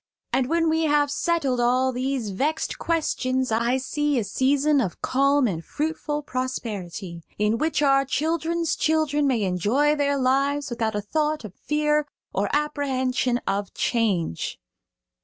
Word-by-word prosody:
And 255 -1 +1
when 330 0 +2
we 320 0 +2
have 290 -1 +2
settled 285 -7 0
all 255 +2 +2
these 255 -3 -2
vexed 290 +11 -1
questions 260 -6 0
I 235 +3 +2
see 295 +2 -1
a 235 - +1
season 275 +7 +2
of 190 -8 -3
calm 275 +1 +3
and 170 -7 -2
fruitful 300 - -3
prosperity, 205 -10 -4 0.2
in 210 +2 +1
which 310 0 +1
our 275 -1 +4
children's 325 +5 -1
children 305 -2 +1
may 240 -6 +1
enjoy 210 - +2
their 285 -1 +1
lives 275 +1 +1
without 225 -2 -1
a 210 - -1
thought 300 +4 -1
of 200 - -9
fear 300 +2 0 0.3
or - - 0
apprehension 265 -4 0
of 200 0 -2
change." 195 - 0
270 Hz, 140 wpm, -24 LUFS, 235-295 Hz, 0.3 s, our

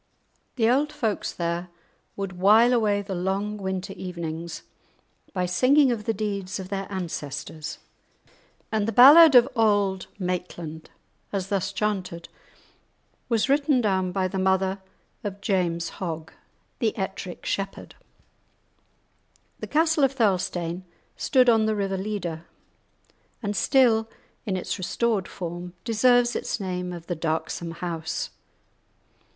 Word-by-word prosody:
The 225 -3 +2
old 280 +5 +2
folks 230 -9 -2
there 170 +1 -3 0.5
would 195 -1 -4
while 220 +6 +6
away 210 -4 +2
the 195 -1 -5
long 195 +4 -2
winter 190 -1 -4
evenings 170 -2 -6 0.7
by 180 -3 -1
singing 260 +9 +4
of 215 -3 -3
the - - +1
deeds 200 -3 -3
of 185 -1 -7
their 195 -1 -3
ancestors, 155 -3 -5 0.9
and 215 -1 0
the - - 0
ballad 285 +6 +9
of 245 0 +8
Auld 205 -4 +2
Maitland, 175 -4 -4 0.4
as 195 -2 -3
thus 195 -2 -1
chanted, 190 -4 -3 1.0
was 230 -3 +2
written 280 -1 +3
down 190 -5 +1
by 185 0 0
the 190 +1 -3
mother 190 +1 +1 0.4
of 200 -2 -5
James 175 -4 0
Hogg, 165 -3 -5 0.5
the 225 -4 0
"Ettrick 190 -2 -5
Shepherd." 195 0 -3 1.7
The - - -6
castle 320 -1 +2
of 270 0 +3
Thirlestane 185 -6 0 0.3
stood 255 -2 +3
on 225 -2 +4
the 215 - +1
river 195 -2 -1
Leader, 185 -5 -4 1.0
and 205 0 -2
still, 225 -3 +3 0.4
in 190 -2 0
its 185 - -4
restored 210 +1 0
form, 175 0 -6
deserves 245 +1 +3
its - - -2
name 180 -2 -3
of 170 -2 -8
"the 175 - -3
darksome 165 +1 -2
house." 165 -1 -4
195 Hz, 125 wpm, -25 LUFS, 180-225 Hz, 1.7 s, ballad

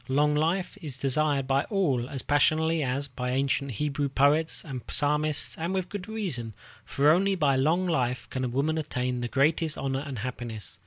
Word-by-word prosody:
Long 150 +3 +2
life 170 +6 0
is 145 -6 -5
desired 140 +1 +1
by 135 +1 +1
all 140 - 0
as 135 - -3
passionately 160 +3 +2
as 135 +1 -1
by 125 -1 -4
ancient 135 +1 0
Hebrew 145 +4 -1
poet 145 +4 +2
and 135 -5 -5
psalmist, 150 +1 0
and 170 +4 -2
with 185 -1 -2
good 205 -1 -6
reason, 165 - -2 0.3
for 145 +2 +3
only 195 +4 +3
by 145 -6 +2
long 160 +8 +2
life 130 -8 0
can 130 - -2
a - - 0
woman 145 +6 0
attain 125 -4 -2
the 120 - -1
greatest 155 +4 +1
honor 135 0 -2
and 140 -4 -6
happiness. 115 -4 -5
145 Hz, 180 wpm, -27 LUFS, 130-160 Hz, 0.3 s, for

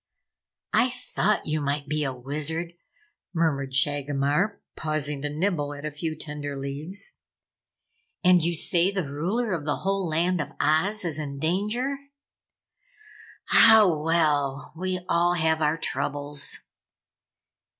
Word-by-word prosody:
"I 250 - +4
thought 240 -4 -1
you 155 0 -1
might 145 0 -1
be 150 +1 -1
a 135 - -1
Wizard," 155 +6 -3 0.6
murmured 140 -5 0
Shagomar, 145 +6 +1 0.2
pausing 150 -2 -1
to 145 - -2
nibble 150 -2 -1
at 145 +1 -8
a 155 - -3
few 155 +2 -4
tender 145 -2 -5
leaves. 150 - -5 1.0
"And 180 -2 +5
you 170 +1 +1
say 175 +3 +2
the 190 -6 -2
Ruler 190 - -1
of 165 -4 -2
the 145 0 0
whole 195 -1 0
Land 170 +2 +1
of 145 - -6
Oz 190 +7 +2
is 160 -2 -2
in 140 -2 -5
danger? 210 - -1 1.5
Hah, 220 -2 +8
well 150 -5 +1
we 185 +1 -2
all 175 0 +3
have 160 -1 +1
our 150 +1 +2
troubles." 145 0 -1
155 Hz, 130 wpm, -26 LUFS, 145-180 Hz, 1.5 s, Hah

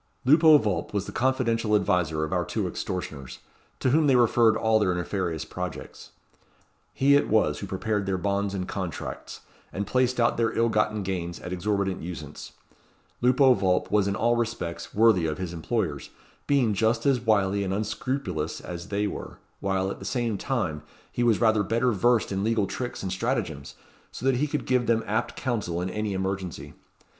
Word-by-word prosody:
Lupo 155 +3 +7
Vulp 105 -4 -2
was 100 -1 0
the - - -7
confidential 115 -4 +1
adviser 90 -6 +1
of 80 - -3
our - - +1
two - - -2
extortioners, 70 -8 -5 0.4
to 130 - +1
whom 155 +2 +4
they 135 - +5
referred 115 -2 +4
all 110 -1 +3
their 100 -4 +2
nefarious 90 -3 -2
projects. - - -7 0.8
He 140 +1 +3
it 145 - +2
was 110 0 +2
who 100 - -6
prepared 100 +1 -2
their 95 -1 0
bonds 100 +1 -1
and 90 -1 -3
contracts, 95 -5 -6 0.3
and 100 - -3
placed 125 +3 +1
out 115 0 +2
their 115 -1 0
ill 115 0 +3
gotten 105 -1 0
gains 85 -3 -4
at 90 - -5
exorbitant 95 +1 -1
usance. 80 -4 -8 0.7
Lupo 130 +2 +5
Vulp 95 -4 0
was 105 -1 +3
in 100 - 0
all 120 +2 +2
respects 115 -8 -3
worthy 105 -6 +4
of 75 -1 -3
his 90 -2 -5
employers, 85 - -2 0.4
being 130 -7 +3
just 115 +3 +1
as 135 -3 +3
wily 100 -3 +2
and 95 - -2
unscrupulous 105 - -3
as 85 +1 -7
they 105 0 -1
were, 105 - -6 0.2
while, 95 0 -1
at - - -7
the - - -9
same 120 -4 -1
time, 95 - -2 0.3
he - - -3
was 115 -4 +3
rather 110 -2 +3
better 115 +5 +1
versed 115 +2 +2
in 95 0 -1
legal 110 -2 +1
tricks 120 +3 -5
and 95 - -3
stratagems, 80 -6 -3 0.4
so 125 - -7
that 135 -2 +3
he 150 +4 +1
could 145 -2 -3
give 125 -2 +1
them 115 -1 +2
apt 110 - -1
counsel 105 -9 -2
in 90 +1 -3
any 105 0 -2
emergency. 95 -2 -4
105 Hz, 180 wpm, -26 LUFS, 95-120 Hz, 0.8 s, Lupo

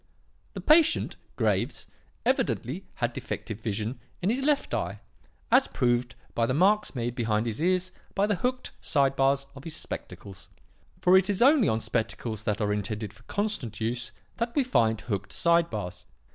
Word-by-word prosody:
The - - -4
patient, 310 +1 +4 0.2
Graves, - - 0 0.4
evidently 140 - 0
had 120 -2 -1
defective 110 -2 -5
vision 110 +2 -3 0.2
in 185 +4 +1
his 255 +3 0
left 290 +1 +1
eye, - - -2 0.5
as 255 +3 +6
proved 120 -2 0 0.2
by 115 -1 +1
the 130 - 0
marks 200 +2 +3
made 120 -1 -2
behind 115 -2 0
his 115 +3 -3
ears 185 +1 +1 0.2
by 195 - +3
the 210 - +1
hooked 250 +6 -1
side 135 -2 +2
bars 135 +1 +2
of 135 -1 -11
his 160 0 -6
spectacles; 100 -9 -7 0.5
for 180 +1 +6
it 190 +1 -3
is 205 +3 +2
only 275 -4 +6
on 110 - +1
spectacles 110 -1 -2
that 105 0 0
are 105 -1 +1
intended 105 0 -3
for - - -19
constant 205 - -2
use 120 +2 -2 0.3
that 235 0 -2
we 285 - +4
find 110 - +2
hooked 100 -4 -3
side 170 0 +3
bars. 100 -5 -6
130 Hz, 170 wpm, -28 LUFS, -, 0.5 s, as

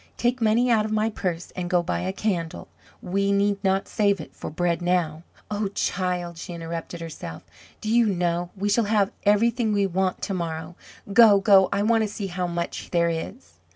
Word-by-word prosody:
Take 245 +1 0
money 225 +3 +3
out 220 -2 +4
of 215 - -4
my 215 +1 +1
purse 180 -4 -4
and 180 -1 -3
go 175 -1 +2
buy 170 - -2
a 185 +1 -2
candle. 185 -5 -3 0.4
We 200 +2 0
need 200 0 +1
not 195 0 +1
save 200 -3 +1
it 155 - -10
for - - -6
bread 170 +2 -1
now. 175 -3 0 0.3
Oh, 205 0 -1
child!" 180 -2 -2
she 175 - -7
interrupted 170 0 -6
herself, 150 - -7 0.4
"do - - -6
you 235 -2 +5
know, 175 -2 0
we 200 +2 -1
shall 215 +2 +2
have 205 -2 +2
everything 220 +2 +3
we 200 -1 +2
want 190 0 -1
to 195 - -2
morrow. 165 -1 -4 0.4
Go! 215 -3 +7
Go! 195 -2 +5
I 200 +1 +1
want 225 +1 +3
to - - 0
see 205 0 -5
how 180 -1 -2
much 170 0 -4
there 170 -1 +2
is." 165 +10 -7
190 Hz, 195 wpm, -24 LUFS, 175-210 Hz, 0.4 s, Go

